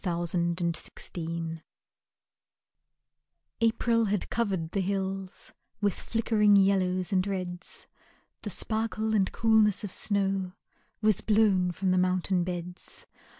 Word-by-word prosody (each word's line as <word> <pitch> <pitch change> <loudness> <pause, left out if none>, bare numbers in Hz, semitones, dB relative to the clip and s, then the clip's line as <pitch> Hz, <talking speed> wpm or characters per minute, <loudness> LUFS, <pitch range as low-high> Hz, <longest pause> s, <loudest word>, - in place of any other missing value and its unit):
Azure 175 -2 -2
and 170 -1 -1 0.2
Gold 165 -1 -4 2.0
April 230 0 +2
had 205 -1 -2
covered 190 -8 -1
the 195 - 0
hills 190 0 -3 0.3
With 205 -2 +1
flickering 215 -2 +2
yellows 185 -2 +2
and 185 +1 +2
reds, 180 -2 -5 0.6
The - - -5
sparkle 220 0 -1
and 195 -3 +2
coolness 220 -2 +3
of 205 - -4
snow 195 -3 0 0.5
Was 215 -3 +4
blown 205 -4 +3
from 185 +2 -1
the 185 - +3
mountain 185 0 +1
beds. 180 0 -6
190 Hz, 110 wpm, -28 LUFS, 180-210 Hz, 2.0 s, Was